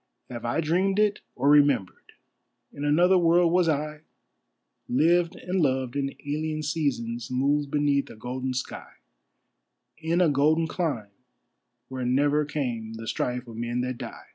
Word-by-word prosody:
Have 120 -1 -6
I 120 +7 0
dreamed 185 +5 +1
it 210 -1 +2 0.2
or 135 +3 0
remembered? 145 -10 +3 0.6
In 145 - -7
another 175 +5 +4
world 170 0 +4
was 175 -1 +3
I, 150 0 -2 0.9
Lived 170 +6 +3
and 180 0 -2
loved 130 -3 0
in 140 -1 -2
alien 155 +1 -2
seasons, 125 -6 -2
moved 140 +3 +1
beneath 145 -1 +1
a - - -11
golden 130 +3 -4
sky, 130 - -6 1.1
In 165 +2 0
a 180 - +5
golden 155 +3 +3
clime 145 - -3 0.8
where 130 0 -5
never 145 +4 +2
came 120 -7 -3
the 115 0 -8
strife 125 +1 -2
of 115 -1 -10
men 120 +1 -2
that 125 -1 -4
die. - - -9
145 Hz, 145 wpm, -26 LUFS, 125-160 Hz, 1.1 s, a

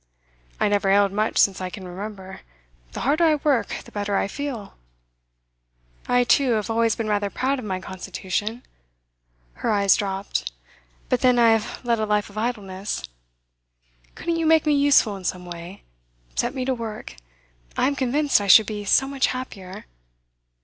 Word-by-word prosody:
'I - - +2
never 200 -1 +1
ailed 200 0 +4
much 215 +2 -1
since 195 -1 +3
I 185 - -3
can 185 0 -9
remember. 190 +1 -8 0.5
The - - -5
harder 300 +6 +2
I 315 -2 +5
work, 285 -4 +1 0.2
the - - -14
better 205 -1 -2
I - - 0
feel.' 245 -3 -6 1.3
'I, 245 0 +3
too, 255 0 +3
have 215 0 -1
always 230 0 +2
been 225 - -3
rather 205 -1 0
proud 265 +5 -1
of 245 - -7
my 190 -2 -2
constitution.' 190 +5 -4 1.0
Her - - 0
eyes 200 -2 +4
dropped. 195 - -3 0.6
'But - - 0
then 250 -1 +4
I 230 -1 +6
have 225 +3 -1
led 235 -2 +1
a 215 - -1
life 210 -1 0
of 205 - -13
idleness. 205 - -3 1.1
Couldn't 335 0 -2
you 325 -1 0
make 320 -1 +4
me 300 - +3
useful 280 -7 +4
in 190 - -11
some 180 0 -3
way? 175 +2 -9 0.5
Set 245 +3 -1
me 255 -1 -2
to 265 - +1
work! 225 - -7 0.6
I - - +2
am 280 +2 +1
convinced 275 -1 +2
I 200 - -3
should 215 +3 +8
be 210 -1 -5
so 270 +6 +4
much 275 -1 +1
happier. 200 - -7
215 Hz, 170 wpm, -23 LUFS, 195-255 Hz, 1.3 s, should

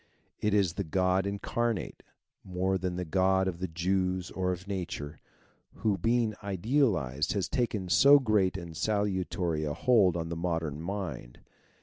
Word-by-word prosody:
It 105 -1 +1
is 95 -5 +2
the - - -3
God 95 +3 +1
incarnate, 110 +2 -2 0.4
more 95 +1 -1
than 90 0 -2
the 90 0 -3
God 95 +2 +2
of 85 -2 -3
the 95 - -2
Jews 90 +2 -1
or 90 -1 -1
of 90 +2 -6
Nature, 90 -7 -5 0.6
who 105 -2 0
being 115 +4 +1
idealized 95 - 0
has 100 -3 -1
taken 110 -6 -1
so 140 +10 +7
great 105 -8 +1
and 85 -3 -8
salutary 95 -5 -1
a 75 -1 -2
hold 100 -9 +3
on 80 -1 -4
the 85 - -3
modern 80 -3 -2
mind. 85 -10 -5
95 Hz, 150 wpm, -29 LUFS, 85-100 Hz, 0.6 s, so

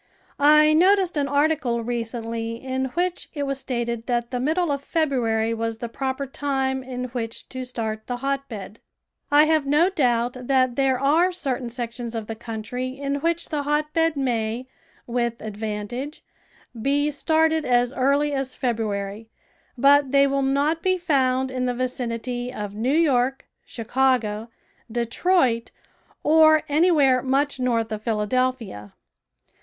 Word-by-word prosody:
I 305 0 +6
noticed 370 +2 +4
an 285 -2 0
article 280 -5 +1
recently 230 -1 -3
in 260 +2 -3
which 355 0 -1
it 290 - -2
was 275 -1 -2
stated 235 -3 -3
that 240 -1 -1
the 250 - -2
middle 315 +5 +1
of 280 -1 -2
February 235 -9 0
was 225 0 -3
the 235 - -5
proper 265 +2 -3
time 265 -1 -1
in 255 -1 -5
which 230 -1 -5
to 260 0 -5
start 220 -3 -4
the 245 - -3
hotbed. 255 -6 -4 0.5
I 295 0 +6
have 310 -2 +2
no 310 +6 +3
doubt 245 -7 +1
that 255 -2 +2
there 270 -2 +2
are 320 +7 +3
certain 270 -8 -3
sections 235 -1 -5
of 225 -1 -3
the 225 - -5
country 230 +2 -5
in 280 0 -2
which 335 +3 -1
the 300 -2 -1
hotbed 305 +2 0
may, 235 -2 -1 0.4
with 235 -1 -2
advantage, 220 +6 -5 0.6
be 285 +4 +1
started 320 +2 +2
as 245 -1 +2
early 280 +3 +2
as 270 -1 -2
February, 215 -3 -3 0.5
but 280 +1 +5
they 280 0 +5
will 275 0 0
not 285 +4 +1
be 370 +1 +2
found 265 -6 +1
in 255 -1 -1
the 245 - -1
vicinity 245 0 -3
of 210 -5 -6
New 225 +5 -2
York, 270 -5 +2 0.2
Chicago, 230 -2 0 0.4
Detroit, 240 +1 +1 0.5
or 315 0 +5
anywhere 290 -5 +4
much 275 +2 0
north 230 -3 0
of 215 -1 -4
Philadelphia. 220 - -2
260 Hz, 140 wpm, -23 LUFS, 235-285 Hz, 0.6 s, I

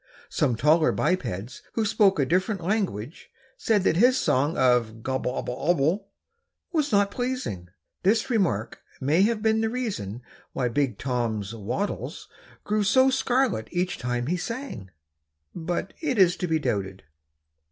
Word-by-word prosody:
Some 120 - +1
taller 155 +6 +4
bipeds 120 - -2
who 225 - 0
spoke 205 -3 +3
a 140 - +3
different 185 - 0
language 175 - -2 0.3
said 210 -4 +1
that 165 - +2
his 250 +6 +5
song 145 +6 +1
of 115 -3 +2
"gobble 130 -1 -1
obble 125 -1 -4
obble" 175 +5 +1 0.6
was 305 -5 0
not 200 -1 +3
pleasing. 245 - -3 0.3
This 220 +6 +2
remark 180 - 0 0.2
may 150 +7 +2
have 215 +1 +2
been 220 0 +3
the 225 - +1
reason 190 - -4 0.3
why 125 -2 0
Big 125 -3 0
Tom's 115 -5 -2
wattles 115 - -4 0.4
grew 210 0 0
so 260 +6 +4
scarlet 255 - +1
each 180 +1 -2
time 120 0 -2
he 175 +7 0
sang, 230 - -6 0.6
but 175 +3 -3
it 285 -7 -1
is 180 -3 +5
to 180 - -2
be 160 -1 +2
doubted. 100 -9 -3
175 Hz, 145 wpm, -26 LUFS, -, 0.6 s, his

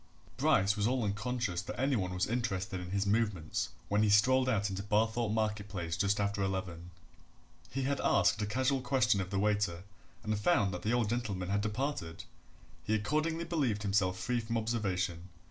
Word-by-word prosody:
Bryce 95 +2 +3
was 105 0 +1
all 125 -1 +1
unconscious 105 -2 -2
that 100 - -7
any 135 +1 +2
one 95 -5 -1
was 90 +1 0
interested 95 -6 -2
in 90 0 -7
his 100 +1 0
movements 100 -6 0 0.2
when 105 +3 +2
he 110 - +3
strolled 130 +6 +4
out 105 -4 +1
into 95 +1 -3
Barthorpe 110 +2 +1
market 105 -1 -1
place 85 -3 -3
just 100 +4 +1
after 100 0 0
eleven. 95 -3 -3 0.8
He 135 +1 -3
had 140 +1 0
asked 90 +3 +3
a 105 - -1
casual 130 +5 +1
question 125 -6 +2
of 95 - -5
the 100 - -2
waiter 100 -4 0 0.4
and 110 0 0
found 105 - +2
that 90 - -4
the 110 - -1
old 120 -2 +2
gentleman 105 -6 -2
had 100 +1 +1
departed 105 - -3 0.6
he 110 +5 +1
accordingly 155 +9 0
believed 135 -12 0
himself 100 -2 +1
free 125 +4 -1
from 115 0 -2
observation. 95 -6 -2
105 Hz, 180 wpm, -32 LUFS, 95-120 Hz, 0.8 s, strolled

